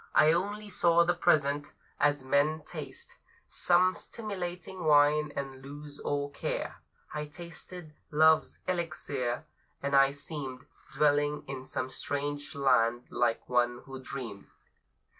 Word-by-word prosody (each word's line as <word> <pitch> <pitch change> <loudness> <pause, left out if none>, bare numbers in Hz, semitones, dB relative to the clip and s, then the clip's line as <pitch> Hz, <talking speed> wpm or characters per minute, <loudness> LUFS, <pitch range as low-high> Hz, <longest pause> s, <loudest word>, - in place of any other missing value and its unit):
I 155 0 +7
only 205 +5 -1
saw 170 -1 +5
the 175 +1 +2
present: 145 -4 +2 0.3
as 145 -2 +2
men 145 +3 +2
taste 145 -6 -7 0.3
Some 180 +1 +3
stimulating 185 -5 -5
wine, 150 0 +5
and 135 -1 -5
lose 145 +1 -9
all 145 0 -2
care, - - -3 0.4
I 150 0 -3
tasted 170 +1 -9 0.2
Love's 155 +1 +4
elixir, 155 -8 -2 0.4
and 140 0 +1
I 135 0 +7
seemed 140 -2 -6 0.3
Dwelling 145 +1 +2
in 130 -1 -6
some 130 0 -3
strange 145 +1 -2
land, 120 -3 +3
like 120 -1 0
one 120 0 +1
who 135 -1 -8
dreamed. 115 -8 -7
145 Hz, 120 wpm, -30 LUFS, 135-165 Hz, 0.4 s, I